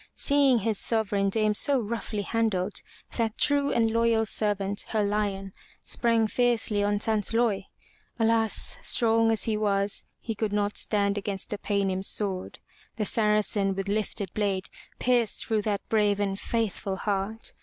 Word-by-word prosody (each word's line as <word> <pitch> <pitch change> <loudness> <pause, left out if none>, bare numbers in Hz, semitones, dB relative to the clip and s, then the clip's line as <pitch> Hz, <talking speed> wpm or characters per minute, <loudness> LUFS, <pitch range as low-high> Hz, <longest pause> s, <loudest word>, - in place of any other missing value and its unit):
Seeing 280 -3 +4
his 220 -1 -1
sovereign 205 -3 +1
dame 215 +1 +1
so 275 +5 +2
roughly 215 -2 -3
handled, 210 -4 -1 0.4
that 225 -2 -1
true 285 -1 +2
and 225 -1 +2
loyal 230 -1 +2
servant, 205 -2 -1
her 215 -2 0
lion, 200 -2 -2 0.3
sprang 230 -2 +1
fiercely 230 -2 +1
on 205 0 +1
Sansloy. 215 -1 0 0.5
Alas! 225 -1 +2
strong 225 -1 +3
as 225 -1 +2
he 220 - 0
was, 200 -1 0 0.2
he 225 - -4
could 215 -1 -3
not 205 0 0
stand 200 -1 +1
against 195 -1 -5
the 210 - -3
Paynim's 195 -2 0
sword. 190 -3 -1 0.4
The 215 - -2
Saracen 210 -2 +1
with 195 +1 -4
lifted 200 -2 -2
blade 200 -3 -1 0.3
pierced 240 -3 +1
through 220 -2 0
that 205 -1 -3
brave 210 -2 +2
and 195 -1 -1
faithful 210 -4 -2
heart. 200 +3 -3
210 Hz, 145 wpm, -27 LUFS, 200-225 Hz, 0.5 s, Seeing